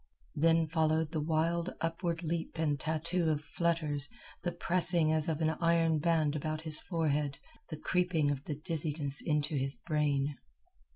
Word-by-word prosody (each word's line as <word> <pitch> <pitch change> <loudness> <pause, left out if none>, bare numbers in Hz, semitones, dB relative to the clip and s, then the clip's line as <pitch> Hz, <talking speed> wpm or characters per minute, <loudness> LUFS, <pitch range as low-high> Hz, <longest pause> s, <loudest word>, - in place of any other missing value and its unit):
Then 165 +2 +3
followed 160 0 +1
the 160 -2 -1
wild 165 +3 0
upward 165 +1 -2
leap 165 0 -3
and 150 -3 0
tattoo 160 +3 0
of 150 -1 0
flutters, 155 -4 -1 0.3
the 175 - -1
pressing 175 -2 +2
as 160 +1 0
of 160 0 -2
an 160 0 +3
iron 165 -2 +3
band 155 -2 +2
about 155 +1 -2
his 155 -1 +2
forehead, 150 -5 -1 0.3
the 155 - -5
creeping 170 -3 +1
of 140 0 -4
the 150 - -3
dizziness 150 -2 0
into 150 -1 0
his 135 +1 -1
brain. 145 -3 -1
160 Hz, 155 wpm, -32 LUFS, 150-165 Hz, 0.3 s, Then